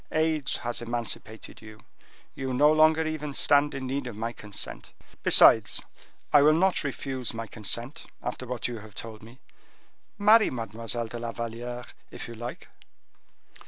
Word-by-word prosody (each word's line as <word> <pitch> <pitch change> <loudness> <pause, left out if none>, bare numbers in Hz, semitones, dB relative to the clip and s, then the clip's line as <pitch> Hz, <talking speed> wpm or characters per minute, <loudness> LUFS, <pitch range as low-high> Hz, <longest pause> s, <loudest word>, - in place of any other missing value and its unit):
Age 155 -2 +1
has 120 0 -3
emancipated 115 -2 -5
you; 110 -1 -13 0.5
you 130 -1 -4
no 150 +4 +5
longer 155 +1 +4
even 150 -2 -4
stand 145 0 +4
in 135 -1 -5
need 135 0 -3
of 120 - -7
my 115 +2 -4
consent. 105 -3 -4 0.3
Besides, - - +6 0.5
I 145 - +8
will 155 +2 +5
not 185 +1 +2
refuse 135 -4 -4
my 115 0 -4
consent 115 +5 -3
after 125 +1 -5
what 125 -1 -3
you 120 -2 -6
have 105 -1 -14
told 110 -1 -7
me. 115 +4 -15 0.8
Marry 215 +2 +5
Mademoiselle 115 0 -3
de 120 +1 -7
la 115 0 -4
Valliere, 120 +1 -6 0.2
if - - -8
you 115 - -8
like." 120 +2 -8
120 Hz, 155 wpm, -27 LUFS, 115-145 Hz, 0.8 s, I